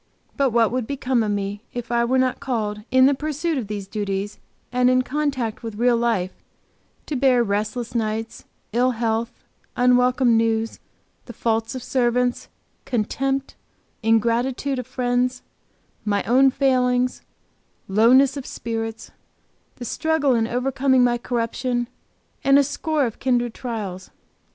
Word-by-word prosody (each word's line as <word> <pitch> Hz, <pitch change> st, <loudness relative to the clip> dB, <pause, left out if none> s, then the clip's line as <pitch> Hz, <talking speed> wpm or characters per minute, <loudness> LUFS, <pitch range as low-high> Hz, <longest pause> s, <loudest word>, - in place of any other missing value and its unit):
But 275 Hz, -1 st, +2 dB
what 230 Hz, -1 st, +3 dB
would 250 Hz, -2 st, -2 dB
become 260 Hz, -3 st, 0 dB
of 215 Hz, -, 0 dB
me 205 Hz, 0 st, -2 dB
if 240 Hz, -1 st, -5 dB
I 235 Hz, 0 st, +2 dB
were 260 Hz, +2 st, +1 dB
not 255 Hz, -1 st, +1 dB
called, 210 Hz, -5 st, -2 dB
in 260 Hz, 0 st, +5 dB
the 280 Hz, -, +5 dB
pursuit 310 Hz, +3 st, -2 dB
of 225 Hz, -, -5 dB
these 205 Hz, -1 st, -5 dB
duties 200 Hz, -1 st, -3 dB, 0.3 s
and 250 Hz, 0 st, +3 dB
in 255 Hz, 0 st, +3 dB
contact 260 Hz, -5 st, -2 dB
with 225 Hz, -3 st, -6 dB
real 240 Hz, +2 st, +3 dB
life, 230 Hz, -6 st, 0 dB, 0.7 s
to 300 Hz, -, -3 dB
bear 255 Hz, -2 st, +4 dB
"restless 215 Hz, +3 st, -2 dB
nights, 225 Hz, -1 st, -3 dB, 0.3 s
ill 250 Hz, +2 st, +2 dB
health, 225 Hz, 0 st, 0 dB, 0.4 s
unwelcome 250 Hz, 0 st, +4 dB
news, 225 Hz, 0 st, 0 dB, 0.5 s
the 240 Hz, -, -9 dB
faults 225 Hz, +2 st, -1 dB
of 255 Hz, -, -5 dB
servants, 245 Hz, -1 st, 0 dB, 0.4 s
contempt, 270 Hz, +4 st, -1 dB, 0.5 s
ingratitude 235 Hz, +4 st, +1 dB
of 250 Hz, -, -6 dB
friends, 250 Hz, 0 st, -1 dB, 0.6 s
my 205 Hz, -2 st, 0 dB
own 265 Hz, +3 st, +5 dB
failings, 250 Hz, -2 st, +1 dB, 0.7 s
lowness 250 Hz, +7 st, +5 dB
of 275 Hz, -2 st, -6 dB
spirits, 225 Hz, -1 st, -5 dB, 0.6 s
the 245 Hz, -, -8 dB
struggle 315 Hz, +1 st, +1 dB
in 225 Hz, -2 st, +1 dB
overcoming 260 Hz, +1 st, +2 dB
my 240 Hz, -1 st, +2 dB
corruption, 240 Hz, +1 st, -2 dB, 0.6 s
and 275 Hz, 0 st, +5 dB
a 285 Hz, -, +5 dB
score 290 Hz, +1 st, -1 dB
of 230 Hz, -, -5 dB
kindred 245 Hz, -3 st, +1 dB
trials!" 205 Hz, -7 st, -5 dB
245 Hz, 140 wpm, -22 LUFS, 225-260 Hz, 0.7 s, in